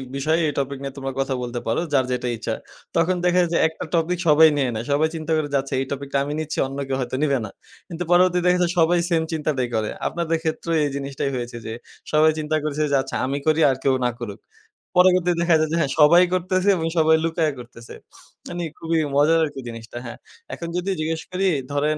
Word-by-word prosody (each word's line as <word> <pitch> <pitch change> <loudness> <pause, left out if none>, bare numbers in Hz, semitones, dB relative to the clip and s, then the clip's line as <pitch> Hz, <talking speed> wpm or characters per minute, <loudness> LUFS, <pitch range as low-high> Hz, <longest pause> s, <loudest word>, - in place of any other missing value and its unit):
বিষয়ে 155 +4 +1
এই 150 - -2
টপিক 140 0 -3
নিয়ে 135 -1 -5
তোমরা 135 -1 -4
কথা 135 0 0
বলতে 120 0 -4
পারো, 115 - +1
যার 130 -2 +3
যেটা 125 0 -2
ইচ্ছা। - - -3 0.4
তখন 170 +2 +2
দেখা 180 0 +3
যায় 175 - 0
যে - - +3
একটা 160 - -7
টপিক 170 +2 +1
সবাই 160 +1 +7
নিয়ে 135 -3 +1
নেয়। 110 +2 -4
সবাই 150 +3 +3
চিন্তা 160 0 -4
করে 150 -2 -2
যাচ্ছে, 135 0 -1
এই 135 - -1
টপিক 140 0 -4
টা - - +3
আমি 145 +1 -4
নিচ্ছি 155 0 -4
অন্য 135 +1 -7
কেউ 135 -1 -1
হয়তো 125 0 -3
নিবে 140 -3 +2
না। - - -7 0.4
কিন্তু 175 0 -5
পরবর্তীতে 180 0 +4
দেখা 180 0 +3
যায় 175 -1 +2
সবাই 170 +2 +4
সেম 165 -2 +2
চিন্তাটাই 150 -5 -1
করে। 110 -1 0 0.2
আপনাদের 165 -1 -1
ক্ষেত্রেও 165 +1 -2
এই 145 - 0
জিনিসটাই 140 -1 -3
হয়েছে, 120 -1 -5
যে 110 - -4 0.4
সবাই 155 +1 +5
চিন্তা 155 0 -1
করেছে 155 0 -1
যে, - - +3
আচ্ছা 135 - -6
আমি 135 +2 -2
করি 155 0 +3
আর 135 - +1
কেউ 135 -1 +3
না - - +3
করুক। 105 -4 -6 0.6
পরবর্তীতে 180 -1 +5
দেখা 170 -1 +4
যায় 155 0 +1
যে, - - 0
হ্যাঁ 140 -5 0
সবাই 170 +4 +7
করতেছে 185 +2 +1
এবং 165 -1 -1
সবাই 160 0 +5
লুকাইয়া 160 -2 0
করতেছে। 120 -1 -11 0.5
মানি 175 0 -4 0.2
খুবই 165 0 0 0.2
মজার 155 +3 +4
আরকি 145 -3 -7
জিনিসটা, 115 0 -9
হ্যাঁ। 120 - -7 0.4
এখন 170 - -6
যদি 180 +2 -1
জিজ্ঞেস 160 +1 -2
করি 190 +1 0 0.3
ধরেন 150 +2 +1
155 Hz, 220 wpm, -22 LUFS, 135-165 Hz, 0.6 s, সবাই